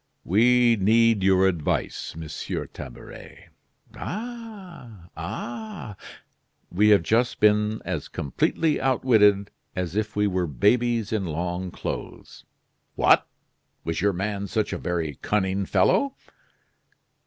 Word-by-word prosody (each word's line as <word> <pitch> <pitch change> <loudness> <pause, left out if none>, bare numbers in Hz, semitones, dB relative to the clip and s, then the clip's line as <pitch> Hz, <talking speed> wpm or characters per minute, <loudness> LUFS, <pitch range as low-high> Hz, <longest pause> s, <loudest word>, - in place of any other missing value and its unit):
"We 120 +4 +4
need 110 +2 +4
your 95 0 +4
advice, 85 -5 -2
Monsieur 80 -1 -5
Tabaret." 65 -2 -11 0.4
"Ah, 195 - -8
ah!" 185 - -6 0.8
"We 105 +4 +3
have 100 -5 +5
just 120 +7 +1
been 105 +1 +2
as - - -3
completely 150 - 0
outwitted 110 -6 +3 0.2
as 90 -1 -3
if 110 0 -2
we 105 0 +2
were 90 -3 0
babies 115 - +1
in 105 -3 0
long 90 +3 -3
clothes." - - -7 0.5
"What! - - +4 0.6
was 80 0 -2
your 100 +1 +3
man 100 +2 -3
such 110 +2 -1
a - - -3
very 85 -5 -3
cunning 95 -1 0
fellow?" 260 - +2
105 Hz, 110 wpm, -25 LUFS, 90-120 Hz, 0.8 s, have